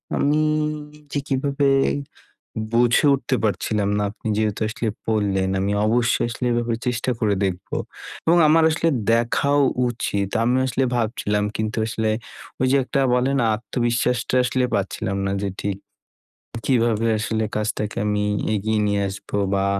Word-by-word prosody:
আমি 150 Hz, +2 st, +2 dB, 0.7 s
যে 145 Hz, -, 0 dB
কীভাবে 140 Hz, 0 st, 0 dB, 1.1 s
বুঝে 120 Hz, +4 st, +4 dB
উঠতে 130 Hz, -1 st, -1 dB
পারছিলাম 105 Hz, 0 st, 0 dB
না -, -, 0 dB
আপনি 110 Hz, -, -13 dB
যেহেতু 110 Hz, -1 st, 0 dB
আসলে 115 Hz, 0 st, -3 dB, 0.2 s
বললেন, 100 Hz, -3 st, +1 dB
আমি 100 Hz, +1 st, 0 dB
অবশ্যই 120 Hz, +2 st, +2 dB
আসলে 125 Hz, +1 st, -3 dB
এ -, -, +1 dB
ব্যাপারে 120 Hz, -1 st, -1 dB
চেষ্টা 125 Hz, +1 st, -1 dB
করে 105 Hz, -2 st, +2 dB
দেখবো 95 Hz, -1 st, -3 dB, 0.5 s
এবং 170 Hz, +2 st, +5 dB
আমার 165 Hz, +1 st, +5 dB
আসলে 160 Hz, +1 st, +1 dB, 0.2 s
দেখাও 140 Hz, +5 st, +2 dB, 0.3 s
উচিৎ 100 Hz, -4 st, -2 dB
আমি 120 Hz, +2 st, +2 dB
আসলে 130 Hz, +1 st, 0 dB
ভাবছিলাম 105 Hz, -3 st, 0 dB
কিন্তু 110 Hz, 0 st, -2 dB
আসলে 110 Hz, -1 st, -1 dB, 0.5 s
ওই 130 Hz, -, +3 dB
যে 140 Hz, -, +4 dB
একটা 135 Hz, -, -1 dB
বলেনা? 130 Hz, +1 st, +2 dB
আত্মবিশ্বাসটা 120 Hz, +2 st, -1 dB
আসলে 125 Hz, +1 st, +1 dB
পাচ্ছিলাম 100 Hz, 0 st, -2 dB
না 95 Hz, -, 0 dB
যে 100 Hz, -, -1 dB
ঠিক 100 Hz, -1 st, -2 dB, 0.9 s
কীভাবে 115 Hz, -3 st, +2 dB
আসলে 110 Hz, +1 st, -1 dB
কাজটাকে 105 Hz, 0 st, -2 dB
আমি 105 Hz, 0 st, 0 dB, 0.3 s
এগিয়ে 110 Hz, +1 st, 0 dB
নিয়ে 100 Hz, -1 st, +1 dB
আসবো 100 Hz, +1 st, -5 dB, 0.2 s
বা 95 Hz, 0 st, +1 dB
115 Hz, 140 wpm, -22 LUFS, 105-125 Hz, 1.1 s, এবং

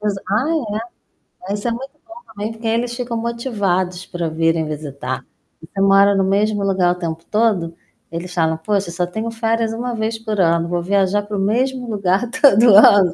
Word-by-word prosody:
Pos 210 Hz, -1 st, -1 dB
ah, 240 Hz, +1 st, 0 dB, 0.5 s
é. 190 Hz, -, -11 dB
Mas 205 Hz, -, -2 dB
isso 225 Hz, -, -4 dB
é -, -, +1 dB
muito 265 Hz, +4 st, -6 dB
bom 335 Hz, -, -13 dB, 0.2 s
também, 210 Hz, +1 st, -4 dB
porque 225 Hz, 0 st, -6 dB
eles 235 Hz, +2 st, 0 dB
ficam 245 Hz, -1 st, -4 dB
motivados 200 Hz, -7 st, -2 dB
para 175 Hz, -1 st, -4 dB
virem 165 Hz, 0 st, +1 dB
visitar. 140 Hz, -4 st, -5 dB, 0.4 s
Você 185 Hz, +5 st, -6 dB
mora 195 Hz, +1 st, +5 dB
no 195 Hz, -, +2 dB
mesmo 205 Hz, +1 st, +1 dB
lugar 185 Hz, -2 st, +2 dB
o 180 Hz, -, -3 dB
tempo 165 Hz, -1 st, -4 dB
todo? 205 Hz, -7 st, 0 dB, 0.4 s
Eles 170 Hz, +2 st, -6 dB
falam: 160 Hz, -2 st, +1 dB
"Poxa, 195 Hz, +2 st, -1 dB
só 175 Hz, +1 st, -1 dB
tenho 220 Hz, +6 st, -4 dB
férias 225 Hz, 0 st, -1 dB
1 240 Hz, +2 st, -3 dB
vez 225 Hz, +1 st, -2 dB
por 215 Hz, -2 st, -4 dB
ano, 170 Hz, 0 st, +2 dB
vou 175 Hz, 0 st, -1 dB
viajar 195 Hz, +2 st, +1 dB
para 205 Hz, 0 st, -5 dB
o -, -, -1 dB
mesmo 250 Hz, +5 st, 0 dB
lugar 200 Hz, +2 st, 0 dB
todo 235 Hz, -6 st, +5 dB
ano". 195 Hz, -3 st, +7 dB
200 Hz, 190 wpm, -19 LUFS, 175-225 Hz, 0.5 s, ano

